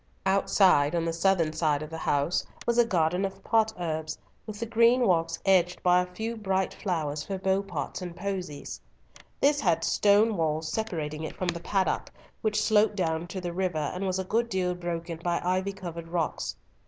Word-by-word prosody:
Outside, 190 Hz, -5 st, +4 dB
on 165 Hz, -1 st, 0 dB
the 165 Hz, -, -1 dB
southern 165 Hz, -2 st, +2 dB
side 155 Hz, -2 st, +1 dB
of 155 Hz, -, -9 dB
the 160 Hz, -, -5 dB
house, 145 Hz, +4 st, +1 dB, 0.2 s
was 235 Hz, 0 st, +2 dB
a 240 Hz, -, +6 dB
garden 180 Hz, -2 st, +1 dB
of 195 Hz, 0 st, -4 dB
potherbs, 175 Hz, -9 st, 0 dB, 0.3 s
with 210 Hz, -1 st, -7 dB
the 230 Hz, -, -2 dB
green 235 Hz, +2 st, +4 dB
walks 165 Hz, -4 st, +1 dB
edged 180 Hz, -2 st, +3 dB
by 180 Hz, 0 st, +5 dB
a 180 Hz, -, -4 dB
few 220 Hz, +5 st, -4 dB
bright 190 Hz, -3 st, -1 dB
flowers 155 Hz, -6 st, -2 dB
for 195 Hz, +3 st, -4 dB
beau 190 Hz, +1 st, +1 dB
pots 180 Hz, -3 st, -5 dB
and 175 Hz, -2 st, -6 dB
posies. 180 Hz, -6 st, -5 dB, 0.6 s
This 285 Hz, +1 st, +3 dB
had 170 Hz, -6 st, +2 dB
stone 210 Hz, +1 st, +3 dB
walls 155 Hz, -1 st, -1 dB
separating 160 Hz, -8 st, -3 dB
it 160 Hz, -, -5 dB
from 185 Hz, -, -2 dB
the 170 Hz, 0 st, -2 dB
paddock, 190 Hz, +2 st, 0 dB, 0.3 s
which 215 Hz, -1 st, +1 dB
sloped 215 Hz, 0 st, +3 dB
down 165 Hz, -3 st, -1 dB
to 190 Hz, +1 st, -5 dB
the 175 Hz, -1 st, -4 dB
river, 175 Hz, -5 st, -1 dB
and 190 Hz, +2 st, -3 dB
was 185 Hz, 0 st, 0 dB
a 190 Hz, -, -1 dB
good 230 Hz, +5 st, 0 dB
deal 185 Hz, -3 st, 0 dB
broken 170 Hz, -1 st, -4 dB
by 175 Hz, -1 st, +1 dB
ivy 185 Hz, +2 st, +1 dB
covered 170 Hz, -4 st, -7 dB
rocks. 165 Hz, -2 st, -2 dB
180 Hz, 190 wpm, -28 LUFS, 165-200 Hz, 0.6 s, a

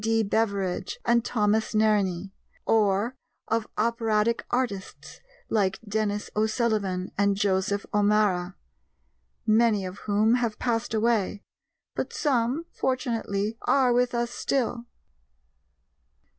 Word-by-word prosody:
D. 225 Hz, 0 st, +2 dB
Beveridge, 200 Hz, -3 st, -1 dB
and 235 Hz, -1 st, +3 dB
Thomas 215 Hz, -1 st, +1 dB
Nerney; 200 Hz, -4 st, +1 dB, 0.3 s
or 215 Hz, +2 st, +2 dB, 0.3 s
of 225 Hz, 0 st, 0 dB
operatic 225 Hz, 0 st, +1 dB
artists 240 Hz, -6 st, -3 dB, 0.3 s
like 195 Hz, -4 st, +1 dB
Denis 210 Hz, 0 st, -2 dB
O'Sullivan 215 Hz, -4 st, 0 dB
and 200 Hz, -1 st, +3 dB
Joseph 200 Hz, 0 st, 0 dB
O'Mara 205 Hz, -3 st, +2 dB, 0.9 s
many 215 Hz, -2 st, +3 dB
of 185 Hz, +1 st, -7 dB
whom 215 Hz, +3 st, +3 dB
have 225 Hz, -3 st, -1 dB
passed 230 Hz, -2 st, -1 dB
away, 215 Hz, -2 st, +1 dB, 0.5 s
but -, -, -4 dB
some, 265 Hz, +2 st, 0 dB
fortunately, 230 Hz, -5 st, -2 dB
are 260 Hz, -3 st, +3 dB
with 245 Hz, 0 st, +1 dB
us 235 Hz, 0 st, -1 dB
still. 240 Hz, -3 st, -1 dB
215 Hz, 105 wpm, -26 LUFS, 200-235 Hz, 0.9 s, and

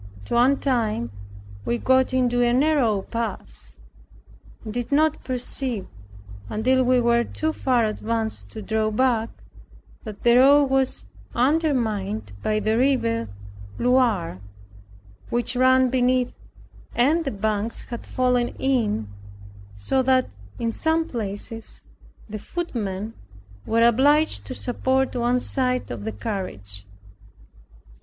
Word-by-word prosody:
At -, -, -15 dB
one 255 Hz, +4 st, +4 dB
time 220 Hz, -, 0 dB, 0.5 s
we 240 Hz, -, 0 dB
got 260 Hz, +1 st, +3 dB
into 245 Hz, -1 st, +2 dB
a 240 Hz, 0 st, +3 dB
narrow 255 Hz, -7 st, +2 dB
pass, 205 Hz, -, -4 dB, 0.9 s
and 215 Hz, -, -5 dB
did 245 Hz, +1 st, -4 dB
not 310 Hz, +2 st, +2 dB
perceive, 250 Hz, -3 st, -2 dB, 0.6 s
until 255 Hz, -, +2 dB
we 255 Hz, 0 st, +3 dB
were 235 Hz, 0 st, +3 dB
too 315 Hz, +6 st, -2 dB
far 250 Hz, -6 st, +1 dB
advanced 220 Hz, +1 st, -2 dB
to 220 Hz, -, -8 dB
draw 220 Hz, +1 st, 0 dB
back, 230 Hz, 0 st, +1 dB, 0.7 s
that 215 Hz, -3 st, -9 dB
the 240 Hz, 0 st, +6 dB
road 280 Hz, +1 st, +6 dB
was 265 Hz, -1 st, +1 dB, 0.3 s
undermined 235 Hz, -, 0 dB
by 215 Hz, 0 st, 0 dB
the 215 Hz, +2 st, +1 dB
river 115 Hz, -, +1 dB, 0.5 s
Loire, 235 Hz, -, +1 dB, 0.9 s
which 240 Hz, +1 st, 0 dB
ran 260 Hz, 0 st, +4 dB
beneath, 250 Hz, -1 st, +2 dB, 0.6 s
and 300 Hz, +8 st, +3 dB
the 280 Hz, -, -2 dB
banks 215 Hz, 0 st, -2 dB
had 235 Hz, -2 st, -6 dB
fallen 250 Hz, -1 st, +1 dB
in; 225 Hz, -, 0 dB, 0.7 s
so 180 Hz, -, 0 dB
that 260 Hz, 0 st, +2 dB, 0.3 s
in 230 Hz, -1 st, -1 dB
some 320 Hz, +6 st, 0 dB
places 225 Hz, 0 st, -4 dB, 0.4 s
the 215 Hz, 0 st, -6 dB
footmen 220 Hz, -, -4 dB, 0.5 s
were 230 Hz, +1 st, +3 dB
obliged 285 Hz, +6 st, +3 dB
to 255 Hz, -, -5 dB
support 260 Hz, +2 st, 0 dB
one 245 Hz, +1 st, +1 dB
side 255 Hz, 0 st, -1 dB
of 110 Hz, -4 st, -6 dB
the 110 Hz, -, -2 dB
carriage. 100 Hz, -, -5 dB
240 Hz, 120 wpm, -23 LUFS, 215-260 Hz, 0.9 s, the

